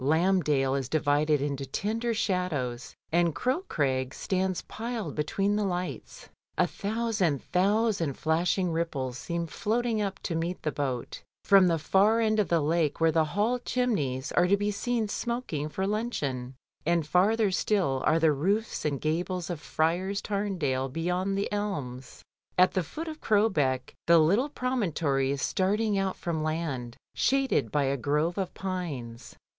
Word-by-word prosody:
Lambdale 150 -3 +2
is 135 -2 -2
divided 150 -1 +2
into 140 -1 -2
tender 220 - -2
shadows, 155 - -2 0.2
and 170 -2 +2
Crow 260 +8 0
Crag 130 -2 -1
stands 190 -1 -1
piled 225 -7 -5
between 195 +7 0
the 210 - +1
lights. 180 -2 -4 0.3
A - - +4
thousand, 205 - -1
thousand 195 - +1
flashing 175 +3 +1
ripples 140 -7 -2
seem 170 0 -3
floating 225 +6 -1
up 195 -1 -2
to 170 - -2
meet 170 +2 -3
the 155 - 0
boat 130 -5 -3 0.2
from 195 -2 +6
the 165 -2 +2
far 200 +8 +3
end 220 -1 +2
of 205 - +2
the 170 -2 +2
lake 155 0 +1
where 165 0 +4
the 160 0 +3
Hall 210 +10 0
chimneys 155 - -1
are 175 - +3
to 200 +2 +4
be 205 +1 0
seen 230 +2 -1
smoking 205 - -3
for 190 +5 -2
luncheon, 145 - -2 0.3
and 170 -1 +1
farther 200 +6 +3
still 180 -9 +1
are 155 - +3
the 160 -1 +4
roofs 195 +10 0
and 145 -3 -1
gables 175 +3 -1
of 165 -4 -5
Friars 180 +5 0
Tamdale 175 -12 -1
beyond 180 +6 -1
the 200 - 0
elms. 145 -12 -4 0.3
At 185 +1 +6
the 185 - +1
foot 305 - -6
of 310 -1 -7
Crowbeck 160 - +1
the 170 0 +7
little 200 - +3
promontory 170 - 0
is 140 -1 -1
starting 205 +3 +1
out 195 -1 0
from 165 -2 -3
land, 155 -7 -3 0.2
shaded 265 - +1
by 145 - +2
a 135 +1 0
grove 150 +7 0
of 190 -2 -2
pines. 145 -11 -5
175 Hz, 155 wpm, -28 LUFS, 145-205 Hz, 0.3 s, the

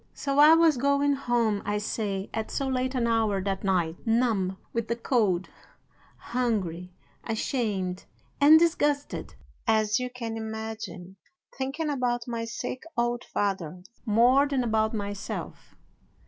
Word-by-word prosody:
"So 275 0 -1
I 305 +2 +9
was 325 -4 +4
going 280 +2 +2
home, 240 -6 0
I 205 +1 -1
say, 205 -2 -3
at 220 -1 -3
so 275 - -2
late 260 0 -1
an 245 -2 +1
hour 225 -4 +1
that 195 -1 -2
night, 175 -4 +1
numb 225 -5 +1 0.2
with 230 -1 -2
the 235 - 0
cold, 210 -7 +1 0.7
hungry, 195 -8 -2 0.3
ashamed, 210 -5 -2 0.3
and 295 +3 +8
disgusted 295 -4 0 0.3
as 215 -1 +3
you 250 0 -3
can 230 -2 -5
imagine, 220 -4 -6 0.4
thinking 280 +4 -2
about 245 -3 -1
my 230 -1 -3
sick 235 +2 -5 0.2
old 240 0 0
father 185 -4 -3 0.2
more 245 +5 +4
than 275 -3 0
about 220 -1 +1
myself. 205 -1 -6
230 Hz, 135 wpm, -27 LUFS, 205-255 Hz, 0.7 s, I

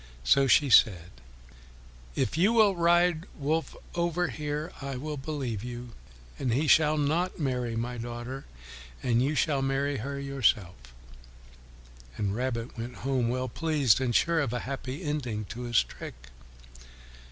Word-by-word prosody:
So 135 - +4
she 135 +1 +4
said, 90 -9 +5 1.0
"If 105 - 0
you 190 +8 +3
will 215 -4 +5
ride 175 -1 +3
Wolf 155 +3 -1 0.2
over 175 0 0
here 150 +1 -4
I 135 -1 -4
will 150 +4 -4
believe 135 -7 -4
you, 120 0 -6 0.5
and 125 - 0
he 140 +7 +1
shall 155 0 +5
not 160 +5 0
marry 125 -5 -1
my 120 +1 -3
daughter, 120 +3 -6 0.6
and 120 -1 +2
you 145 +4 +1
shall 145 -2 +1
marry 135 +1 0
her 140 +5 -4
yourself." 130 -10 +1 1.4
And 100 -1 -1
Rabbit 120 -1 -3
went 120 +1 -5
home 130 -3 +1
well 130 +1 -1
pleased 145 -4 +2
and 120 -3 0
sure 170 -1 +3
of 135 -6 -1
a 125 - -2
happy 135 +3 -5
ending 125 -9 -2
to 120 +2 -6
his 120 -2 +3
trick. - - -9
135 Hz, 145 wpm, -28 LUFS, 120-155 Hz, 1.4 s, said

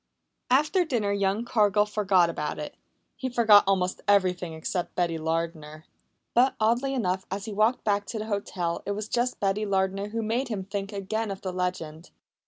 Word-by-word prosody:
After 300 +8 +3
dinner 235 -10 -1
young 200 +3 0
Cargill 210 -3 +3
forgot 200 -4 +3
about 150 -3 -3
it. 150 - -6 0.4
He 260 - -4
forgot 225 -4 +6
almost 185 -2 +1
everything 185 -4 +2
except 170 +3 -4
Betty 170 -2 0
Lardner. 160 -1 -3 0.5
But, 255 +3 +4
oddly 240 +5 +1
enough, 190 -5 -1
as 195 +1 -4
he 220 - -5
walked 215 +4 +2
back 205 -1 0
to 230 - -4
the 215 - -4
hotel 190 -5 -2
it 200 - 0
was 210 +1 -4
just 245 +2 -1
Betty 200 +1 0
Lardner 195 0 0
who 225 +2 -3
made 235 +5 -1
him 210 -5 -3
think 200 +1 -5
again 210 +2 -3
of 195 -1 -5
the 185 -1 -4
legend. 180 -3 -4
200 Hz, 180 wpm, -27 LUFS, 180-220 Hz, 0.5 s, forgot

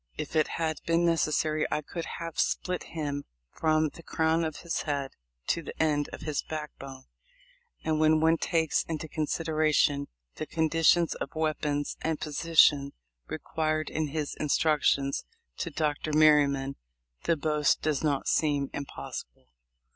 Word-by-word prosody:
If - - -5
it 155 - +4
had 160 -2 -1
been 170 +1 +3
necessary 155 -1 +1
I 150 - -1
could 170 +3 -5
have 165 -1 -5
split 180 -1 0
him 145 -2 -2 0.3
from 155 -1 +2
the 165 - -13
crown 160 0 +1
of 155 -2 -4
his 170 - -2
head 140 -3 -2 0.4
to 170 - +1
the - - -9
end 150 -2 +1
of - - -8
his 150 -2 -1
backbone 140 -4 -7 0.4
;" - - -34
and 155 -1 +1
when 155 0 +4
one 160 +1 +4
takes 160 -1 +1
into 160 -1 -4
consideration 155 -2 +1 0.3
the 155 - -4
conditions 165 +2 +3
of - - -6
weapons 150 -2 -1
and 160 -1 -1
position 150 -2 +3 0.3
required 155 -1 -2
in 155 -1 -1
his 150 0 -3
instructions 145 -2 +2 0.3
to 170 - -3
Dr. 150 0 -1
Merry 150 -1 +6
man 140 0 -3 0.5
the 165 - +2
boast 150 0 +1
does 155 -1 0
not 145 -3 0
seem 145 -3 +1
impossible. 140 - -7
155 Hz, 145 wpm, -29 LUFS, 145-160 Hz, 0.5 s, Merry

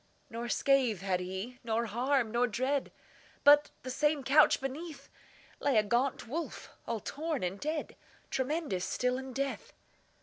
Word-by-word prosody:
Nor 235 +1 -4
scath 255 -9 +2
had 190 -2 0
he, 190 +7 -5
nor 230 0 0
harm, 240 +2 +1
nor 240 +2 +2
dread, 255 +5 -1 0.5
But, 290 +1 +7
the 255 - -4
same 295 +1 +1
couch 285 +4 +5
beneath, 280 +1 -6 0.5
Lay 280 -5 +2
a 215 - +5
gaunt 240 +3 0
wolf, 320 +7 -5 0.2
all 230 -1 -1
torn 305 - -3
and 185 +2 -2
dead, 305 +1 -3 0.4
Tremendous 265 - -1
still 250 +4 0
in 265 0 -7
death. 275 +1 -3
255 Hz, 145 wpm, -31 LUFS, 230-285 Hz, 0.5 s, But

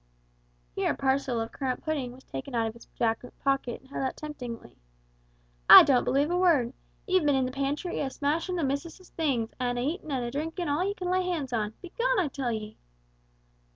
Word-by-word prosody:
Here - - 0
a - - -10
parcel 265 -3 +1
of 225 0 -3
currant 260 -3 -3
pudding 285 -6 -2
was 255 +2 -14
taken 135 - -6
out 230 -1 +2
of 220 - -3
his 235 - -16
jacket 230 +1 -2
pocket 275 -3 0
and 265 - -21
held - - -3
out 265 - -2
temptingly. 245 - -7 0.9
"A' - - +12
don't 260 -3 +3
believe 280 +5 +2
a 355 - +1
word! 290 -10 +3 0.3
Ye've 370 -3 +2
been 290 -2 +3
in 265 -1 +2
the 255 - -3
pantry 280 +6 -2
a 275 - -1
smashin' 310 +7 -1
the 340 - -1
missus' 320 +7 -4
things, 260 -9 -1
and 245 -1 -1
a 245 - -1
eatin' 310 +3 -3
and 255 -3 -1
a 240 - -4
drinkin' 325 +5 -3
all 295 +5 +1
ye 400 +2 -1
can 360 -2 -3
lay 370 0 +2
hands 320 -8 -2
on 215 -2 -1
begone, - - 0
I 340 -6 +1
tell 265 -3 -2
ye!" 215 -1 -6
275 Hz, 210 wpm, -28 LUFS, 245-325 Hz, 0.9 s, A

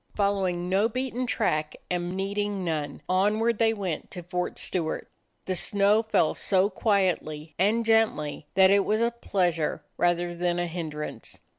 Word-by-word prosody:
Following 190 -4 0
no 195 +4 +2
beaten 255 +1 -2
track 155 -10 0
and 180 +1 -2
needing 200 0 -2
none, 150 -3 -3
onward 210 +4 +2
they 225 -1 +4
went 190 -7 -4
to 180 - -7
Fort 180 +1 -3
Stewart. 165 -4 -2 0.4
The 185 - -1
snow 200 +3 +3
fell 220 -8 +2
so 195 +1 +2
quietly 180 -7 0
and 220 +5 +2
gently 215 -11 +1
that 190 0 +6
it 200 0 +5
was 215 +2 +1
a 235 0 +2
pleasure 175 -9 -1
rather 175 0 +1
than 175 0 -1
a 175 - 0
hindrance. 160 -3 -5
190 Hz, 150 wpm, -27 LUFS, 175-210 Hz, 0.4 s, that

